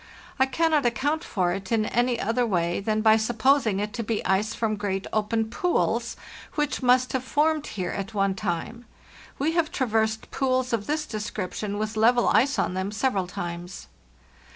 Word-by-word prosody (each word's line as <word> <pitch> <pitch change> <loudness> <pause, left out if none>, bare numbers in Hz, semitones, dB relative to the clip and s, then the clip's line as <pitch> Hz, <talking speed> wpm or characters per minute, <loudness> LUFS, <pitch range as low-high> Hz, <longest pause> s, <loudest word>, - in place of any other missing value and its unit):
I 265 - +4
cannot 315 +1 +2
account 285 +7 0
for 180 -4 0
it 195 +2 -6
in 220 -2 +2
any 240 +1 +1
other 230 +4 +1
way 175 -6 0
than 215 +2 0
by 220 0 +6
supposing 225 -1 +2
it 210 +1 -3
to 230 - -3
be 220 0 -2
ice 195 +3 +1
from 220 -2 0
great 195 -2 -2
open 220 +1 0
pools 360 +6 0 0.4
which 295 -2 -1
must 255 0 +3
have 260 -1 -1
formed 300 +3 +1
here 185 -3 -3
at 195 +2 -5
one 195 -1 +2
time. 200 +5 -4 0.5
We 295 +4 +1
have 330 -2 +1
traversed 220 -3 0
pools 255 -2 0
of 215 -3 -1
this 305 +1 -1
description, 210 -1 -4
with 215 +1 -3
level 240 +2 +4
ice 260 +6 +3
on - - 0
them, 190 +2 -2
several 205 -3 0
times." 175 0 -6
220 Hz, 175 wpm, -25 LUFS, 200-255 Hz, 0.5 s, by